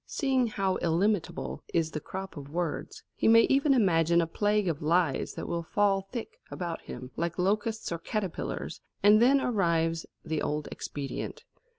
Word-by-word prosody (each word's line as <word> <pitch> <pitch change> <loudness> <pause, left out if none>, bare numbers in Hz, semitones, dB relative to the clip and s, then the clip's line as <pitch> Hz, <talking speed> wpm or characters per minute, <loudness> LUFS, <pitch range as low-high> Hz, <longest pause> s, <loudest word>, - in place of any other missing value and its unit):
Seeing 265 -4 +1
how 195 -3 0
illimitable 175 +1 0
is 165 -1 +2
the 155 - -3
crop 190 +5 -7
of 140 -2 -8
words, 170 0 -3
he - - 0
may 230 +1 +8
even 275 +3 +3
imagine 170 -6 +4
a 170 - +3
plague 205 +4 +1
of 160 -4 -1
lies 160 -2 +1
that - - -5
will 170 -1 -1
fall 195 +2 +1
thick 440 - -6
about 170 -2 -4
him 130 0 -8
like 170 0 -2
locusts 210 +4 0
or 170 - -2
caterpillars; 195 -2 -4 0.2
and 210 +2 +7
then 270 +3 +6
arrives 165 -9 +1 0.2
the 160 -1 -1
old 150 0 -2
expedient. 145 - -5
180 Hz, 165 wpm, -29 LUFS, 165-215 Hz, 0.2 s, may